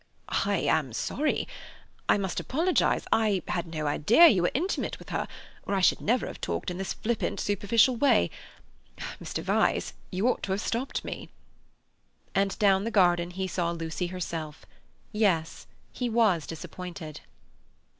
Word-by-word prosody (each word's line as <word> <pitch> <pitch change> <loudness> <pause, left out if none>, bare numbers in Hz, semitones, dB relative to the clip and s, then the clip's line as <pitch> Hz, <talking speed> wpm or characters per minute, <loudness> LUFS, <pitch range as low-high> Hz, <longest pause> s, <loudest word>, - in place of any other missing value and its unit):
"I - - +2
am - - +1
sorry; 300 0 -1 0.6
I - - +6
must 190 -3 -2
apologize. 335 +7 +1
I 210 -4 +2
had 175 -1 -1
no 155 -2 -4
idea 205 - +6
you 190 -6 +3
were 175 - +3
intimate 355 +8 -1
with - - -13
her, - - -2 0.4
or 200 - -1
I 190 - +1
should - - +4
never 240 +4 +1
have - - -8
talked 85 - -2
in 180 - -6
this 195 - -2
flippant, 230 0 -2
superficial 210 +5 +3
way. 235 - +3 0.9
Mr. - - -4
Vyse, - - +1 0.2
you 190 +6 0
ought 255 - +1
to 190 - -1
have 200 - -1
stopped 240 +5 -2
me." - - -6 1.0
And 195 0 +1
down 195 -2 +4
the 230 - -1
garden 175 -5 +3
he 190 +1 -3
saw 175 -1 -1
Lucy 170 +1 -3
herself; 165 -4 -5 0.5
yes, 190 -7 0 0.3
he 245 -1 -2
was 215 -9 +2
disappointed. 165 -1 -7
190 Hz, 155 wpm, -28 LUFS, 170-225 Hz, 1.0 s, I